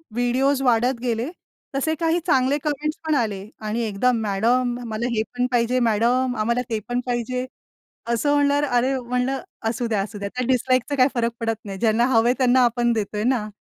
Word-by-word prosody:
Videos 260 Hz, +3 st, +1 dB
वाढत 245 Hz, 0 st, +2 dB
गेले 240 Hz, +2 st, -1 dB, 0.5 s
तसे 315 Hz, +4 st, 0 dB
काही 330 Hz, 0 st, +2 dB
चांगले 265 Hz, -2 st, +3 dB
कमेंट्स 300 Hz, 0 st, -2 dB
पण 310 Hz, -, +2 dB
आले 205 Hz, -6 st, -1 dB, 0.2 s
आणि 220 Hz, +3 st, -1 dB
एकदा 220 Hz, +3 st, +1 dB
मॅडम 235 Hz, +3 st, +1 dB
मला 220 Hz, +2 st, -2 dB
हे 220 Hz, -, +2 dB
पण 245 Hz, 0 st, +1 dB
पाहिजे. 245 Hz, +1 st, +2 dB
मॅडम 240 Hz, +3 st, +2 dB
आम्हाला 235 Hz, +3 st, +1 dB
ते 225 Hz, -2 st, -1 dB
पण 245 Hz, 0 st, 0 dB
पाहिजे. 250 Hz, +1 st, -2 dB, 0.6 s
असं 235 Hz, +5 st, +1 dB
म्हणल्यावर 285 Hz, 0 st, +3 dB
अरे 250 Hz, +1 st, +1 dB
म्हंटलं 250 Hz, +2 st, -1 dB, 0.3 s
असू 240 Hz, +1 st, -2 dB
द्या 215 Hz, -3 st, 0 dB
असू 205 Hz, +1 st, -7 dB
द्या 200 Hz, 0 st, -4 dB
त्या 250 Hz, -1 st, -1 dB
डिसलाईकचा 255 Hz, +2 st, +1 dB
काही 255 Hz, 0 st, +5 dB
फरक 235 Hz, -1 st, 0 dB
पडत 225 Hz, -1 st, -1 dB
नाही. 195 Hz, -2 st, -6 dB
ज्यांना 230 Hz, +2 st, +2 dB
हवंय 230 Hz, +1 st, +4 dB
त्यांना 255 Hz, -1 st, +4 dB
आपण 240 Hz, 0 st, +2 dB
देतोय 210 Hz, -1 st, -2 dB
ना. 240 Hz, -4 st, +1 dB
245 Hz, 180 wpm, -23 LUFS, 225-260 Hz, 0.6 s, काही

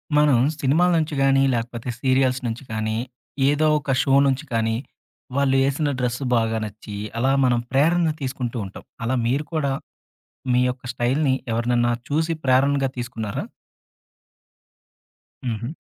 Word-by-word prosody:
మనం 150 Hz, -4 st, +5 dB, 0.2 s
సినిమాల 160 Hz, +7 st, +3 dB
నుంచి 155 Hz, -1 st, -2 dB
గానీ 135 Hz, 0 st, +4 dB
లేకపోతే 120 Hz, +1 st, -3 dB
సీరియల్స్ 130 Hz, -1 st, +2 dB
నుంచి 115 Hz, +3 st, -4 dB
కానీ 110 Hz, 0 st, -1 dB, 0.5 s
ఏదో 150 Hz, +2 st, +2 dB
ఒక 140 Hz, -1 st, -3 dB
షో 135 Hz, -, +1 dB
నుంచి 135 Hz, +3 st, 0 dB
కానీ, 115 Hz, -1 st, +1 dB, 0.6 s
వాళ్ళు 140 Hz, -1 st, +2 dB
ఏసిన 145 Hz, +2 st, 0 dB
డ్రెస్సు 125 Hz, +2 st, -1 dB
బాగా 115 Hz, -1 st, +1 dB
నచ్చి, 105 Hz, 0 st, -9 dB, 0.2 s
అలా 130 Hz, +3 st, +2 dB
మనం 120 Hz, -1 st, +3 dB
ప్రేరణ 160 Hz, +4 st, +3 dB
తీసుకుంటూ 130 Hz, -2 st, -3 dB
ఉంటాం. 95 Hz, -, -10 dB, 0.2 s
అలా 130 Hz, +3 st, +1 dB
మీరు 135 Hz, +6 st, 0 dB
కూడా, 145 Hz, -4 st, 0 dB, 0.8 s
మీ 125 Hz, -, +4 dB
యొక్క 125 Hz, 0 st, -6 dB
స్టైల్‌ని 130 Hz, +4 st, +1 dB, 0.2 s
ఎవరినన్నా 120 Hz, +1 st, +1 dB, 0.2 s
చూసి 160 Hz, +3 st, +1 dB
ప్రేరణగా 135 Hz, +1 st, +3 dB
తీసుకున్నారా? 115 Hz, -4 st, -4 dB, 2.0 s
హుహు. 115 Hz, -1 st, -2 dB
130 Hz, 130 wpm, -23 LUFS, 120-140 Hz, 2.0 s, మనం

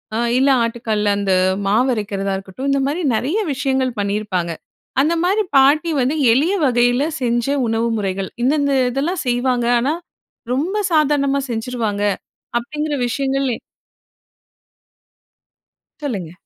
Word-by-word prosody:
அ -, -, 0 dB, 0.2 s
இல்ல 270 Hz, +2 st, +3 dB
ஆட்டுக்கல்ல 225 Hz, -3 st, -1 dB
அந்த 195 Hz, -2 st, +1 dB, 0.3 s
மாவு 245 Hz, +6 st, +3 dB
அரைக்கிறதா 200 Hz, -2 st, -2 dB
இருக்கட்டும். 195 Hz, +8 st, -5 dB
இந்த 275 Hz, 0 st, +2 dB
மாதிரி 320 Hz, +5 st, -2 dB
நிறைய 300 Hz, -, 0 dB
விஷயங்கள் 265 Hz, -1 st, 0 dB
பண்ணியிருப்பாங்க, 200 Hz, -4 st, -1 dB, 0.5 s
அந்த 310 Hz, +4 st, +2 dB
மாதிரி 405 Hz, +4 st, +2 dB
பாட்டி 295 Hz, +5 st, +4 dB
வந்து 270 Hz, +5 st, +1 dB, 0.2 s
எளிய 300 Hz, +11 st, +3 dB
வகையில 245 Hz, +1 st, +3 dB, 0.2 s
செஞ்ச 240 Hz, -1 st, +1 dB, 0.2 s
உணவு 225 Hz, +1 st, 0 dB
முறைகள், 195 Hz, -2 st, -2 dB
இந்தந்த 280 Hz, +1 st, +2 dB, 0.2 s
இதெல்லாம் 305 Hz, +7 st, -1 dB
செய்வாங்க, 245 Hz, 0 st, +1 dB
ஆனா 275 Hz, +6 st, +1 dB, 0.6 s
ரொம்ப 345 Hz, +11 st, -1 dB, 0.2 s
சாதாரணமா 280 Hz, -2 st, +2 dB
செஞ்சுருவாங்க 225 Hz, -3 st, -2 dB, 0.6 s
அப்படிங்கிற 300 Hz, +5 st, -3 dB
விஷயங்கள். 275 Hz, +2 st, -1 dB
எ -, -, -11 dB, 2.5 s
சொல்லுங்க. 195 Hz, -, -3 dB
250 Hz, 115 wpm, -19 LUFS, 215-280 Hz, 2.5 s, பாட்டி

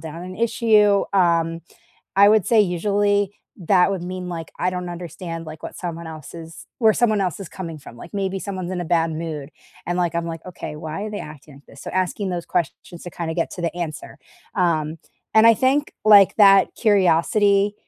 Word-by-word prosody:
down 165 Hz, +2 st, -8 dB
an 185 Hz, +1 st, -8 dB
issue. 215 Hz, -3 st, +3 dB
Um, 170 Hz, -3 st, +2 dB, 0.5 s
I 200 Hz, +1 st, +7 dB
would 215 Hz, -3 st, +3 dB
say 225 Hz, -2 st, +4 dB
usually 205 Hz, +2 st, +1 dB, 0.3 s
that 185 Hz, +1 st, +3 dB
would 190 Hz, -3 st, -3 dB
mean 180 Hz, 0 st, -6 dB
like, 165 Hz, -2 st, -6 dB
I 180 Hz, -, 0 dB
don't 180 Hz, -1 st, -5 dB
understand 170 Hz, -1 st, -7 dB
like 155 Hz, 0 st, -10 dB
what -, -, -7 dB
someone 170 Hz, -2 st, -6 dB
else 155 Hz, 0 st, -10 dB
is 165 Hz, 0 st, -10 dB
where 220 Hz, -3 st, +5 dB
someone 215 Hz, -3 st, +1 dB
else 180 Hz, -1 st, -3 dB
is 190 Hz, -, -7 dB
coming 165 Hz, -4 st, -7 dB
from, 120 Hz, -4 st, -13 dB
like 170 Hz, -, -12 dB
maybe 195 Hz, -1 st, -2 dB
someone's 185 Hz, -2 st, -5 dB
in 185 Hz, -, -3 dB
a -, -, -5 dB
bad 165 Hz, 0 st, +1 dB
mood, 155 Hz, -3 st, -5 dB, 0.4 s
and, 175 Hz, -, -1 dB
like, 175 Hz, -2 st, 0 dB
I'm 170 Hz, 0 st, -1 dB
like, 165 Hz, -1 st, -7 dB
"Okay, 175 Hz, -4 st, -7 dB
why 160 Hz, +5 st, -6 dB
are 215 Hz, -, -5 dB
they 205 Hz, -, -5 dB
acting 150 Hz, -1 st, -11 dB
like 140 Hz, +1 st, -18 dB
this?" 140 Hz, -, -15 dB
So, -, -, -6 dB
asking 185 Hz, +2 st, -1 dB
those 175 Hz, -1 st, -3 dB
questions 170 Hz, 0 st, -3 dB
to 175 Hz, -, -7 dB
kind 165 Hz, -1 st, -5 dB
of 160 Hz, -, -5 dB
get 170 Hz, -, -1 dB
to 180 Hz, -, -7 dB
the 170 Hz, 0 st, -2 dB
answer. 160 Hz, -4 st, -6 dB, 0.4 s
Um, 160 Hz, -3 st, 0 dB, 0.4 s
and 220 Hz, +1 st, +7 dB
I 230 Hz, -, +8 dB
think, 275 Hz, +5 st, +1 dB
like, 205 Hz, -3 st, +7 dB
that 195 Hz, -2 st, +6 dB
curiosity 200 Hz, +1 st, +3 dB
180 Hz, 210 wpm, -22 LUFS, 165-200 Hz, 0.5 s, I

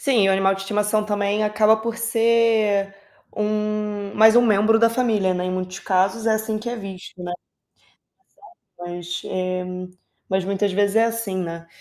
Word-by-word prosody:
Sim, 240 Hz, -8 st, +3 dB
o 195 Hz, -, +4 dB
animal 195 Hz, 0 st, +2 dB
de 195 Hz, -, -7 dB
estimação 210 Hz, +1 st, 0 dB
também 205 Hz, 0 st, 0 dB
acaba 215 Hz, +1 st, +3 dB
por 230 Hz, +1 st, -4 dB
ser 225 Hz, -3 st, +2 dB, 0.4 s
um 210 Hz, -1 st, -2 dB
mais 220 Hz, +1 st, +6 dB
um 240 Hz, -, +7 dB
membro 215 Hz, +1 st, +3 dB
da 230 Hz, 0 st, +5 dB
família, 225 Hz, -6 st, +1 dB
né, 180 Hz, 0 st, -2 dB
em 185 Hz, -, -2 dB
muitos 185 Hz, +1 st, -4 dB
casos 195 Hz, +5 st, 0 dB
é 225 Hz, -, +3 dB
assim 220 Hz, 0 st, -2 dB
que 225 Hz, +3 st, -5 dB
é 240 Hz, -, -3 dB
visto, 190 Hz, -4 st, -9 dB
né. 175 Hz, 0 st, -5 dB, 1.3 s
Exato, 175 Hz, 0 st, -11 dB
mas, 175 Hz, 0 st, -5 dB
eh, 185 Hz, -1 st, -3 dB, 0.6 s
mas 190 Hz, -1 st, 0 dB
muitas 200 Hz, +1 st, -1 dB
vezes 205 Hz, +2 st, +1 dB
é 225 Hz, -, +5 dB
assim, 230 Hz, -4 st, -3 dB
né. 170 Hz, -2 st, -5 dB
210 Hz, 175 wpm, -22 LUFS, 190-220 Hz, 1.3 s, um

